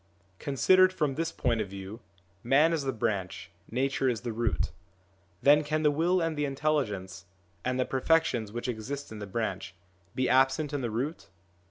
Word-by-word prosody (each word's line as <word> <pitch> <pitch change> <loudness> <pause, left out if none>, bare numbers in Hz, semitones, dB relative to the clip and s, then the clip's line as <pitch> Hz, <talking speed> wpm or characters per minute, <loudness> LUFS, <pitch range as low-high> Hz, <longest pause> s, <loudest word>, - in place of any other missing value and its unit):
Considered 185 +7 +4
from 150 -6 -1
this 165 +4 -2
point 115 -3 0
of 100 - -4
view 100 +3 -8 0.4
man 145 +7 +4
is 155 -4 -1
the 135 - +1
branch, 100 -5 -3 0.2
nature 135 +2 0
is 120 -3 -2
the 120 -2 -4
root; 115 0 -1 0.7
then 150 +2 +6
can 155 +1 -1
the 150 - +5
will 170 +5 +2
and 165 -2 -1
the 150 - -1
intelligence, 130 - -2 0.4
and 125 0 -1
the 130 - +2
perfections 130 -6 +1
which 120 +3 -4
exist 125 +4 -5
in 110 - -7
the 105 - -6
branch, 95 -3 -3 0.4
be 130 - +1
absent 135 +3 +3
in 145 - -1
the 120 - -2
root 130 +9 -3
130 Hz, 175 wpm, -29 LUFS, 110-150 Hz, 0.7 s, then